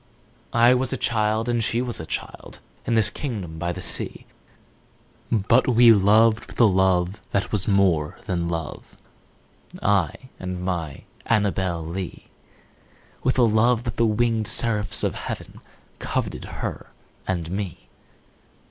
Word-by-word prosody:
I 120 +2 +6
was 125 0 0
a 135 - -1
child 110 0 0
and 120 -2 +1
she 115 - 0
was 125 -1 -3
a 80 - -7
child, - - -6 0.3
In 115 - +2
this 110 -2 +3
kingdom 95 - -5
by 85 +1 -1
the 95 +1 -6
sea; - - -4 1.1
But 115 +3 +3
we 120 -1 +7
loved 110 +2 +4
with - - -12
a - - +7
love 95 0 +2
that 100 +1 -1
was 105 -3 +2
more 95 -7 +2
than 85 -2 -1
love 80 -3 -6 0.8
I 95 -6 +1 0.2
and 90 -1 -5
my 85 -6 -4 0.2
Annabel 95 -6 0
Lee; 90 +2 -6 0.9
With 130 - 0
a 125 - +5
love 115 +1 +3
that 115 -3 -5
the 115 - +3
winged 110 0 +1
seraphs 105 -3 +1
of - - +1
heaven - - -7 0.4
Coveted - - -3
her - - -6 0.4
and 85 -3 -2
me. 95 -11 -5
105 Hz, 140 wpm, -23 LUFS, 90-115 Hz, 1.1 s, we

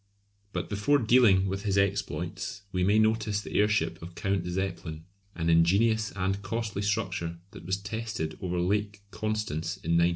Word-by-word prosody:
But - - -3
before 105 +8 +2
dealing 115 -6 +5
with 95 +1 -2
his 100 -2 0
exploits 100 0 -1
we 90 -1 0
may 100 +3 +4
notice 110 -1 +2
the 105 - -8
airship 105 +1 +1
of 85 +1 -9
Count 95 -2 -1
Zeppelin, 90 -3 -3 0.3
an 85 -1 -2
ingenious 100 +7 +3
and 95 +1 -1
costly 105 0 -3
structure 95 -5 -1
that 85 - -11
was 95 +1 +1
tested 100 -5 -4
over 90 -1 -1
Lake 100 +3 0
Constance 105 -6 -2
in 85 -3 -4
1900. 85 +1 +5
100 Hz, 160 wpm, -28 LUFS, 90-105 Hz, 0.3 s, dealing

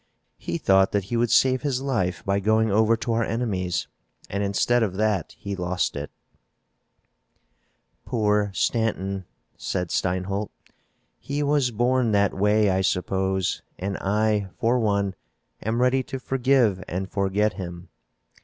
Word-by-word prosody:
"He 85 - -3
thought 95 +2 +3
that 100 -1 +1
he - - +2
would 120 0 +2
save 130 +2 +4
his 140 -4 -1
life 105 -10 -1
by 100 0 +1
going 110 +2 +2
over 110 +2 +3
to 115 +1 -2
our 115 +1 +1
enemies, 95 -7 -1 0.5
and, 100 - -1
instead 100 +5 +2
of 100 -5 0
that, 105 -4 0
he 100 0 -5
lost 90 0 -1
it." - - -5 1.9
"Poor 105 -3 +1
Stanton," 100 -3 -1 0.3
said 90 -2 -3
Steinholt. 95 +3 -1 0.7
"He 145 +1 -3
was 145 -3 +2
born 120 0 +1
that 100 -1 +3
way, 105 +1 +3
I 95 +1 +1
suppose, 95 0 0 0.2
and 100 +1 -3
I, 105 0 0
for 120 +2 +2
one, 100 -3 +1 0.5
am 110 +2 -1
ready 130 +1 +3
to 130 +1 -6
forgive 130 -7 +2
and 95 +2 -3
forget 100 +2 0
him. 85 -2 -8
105 Hz, 140 wpm, -24 LUFS, 95-115 Hz, 1.9 s, save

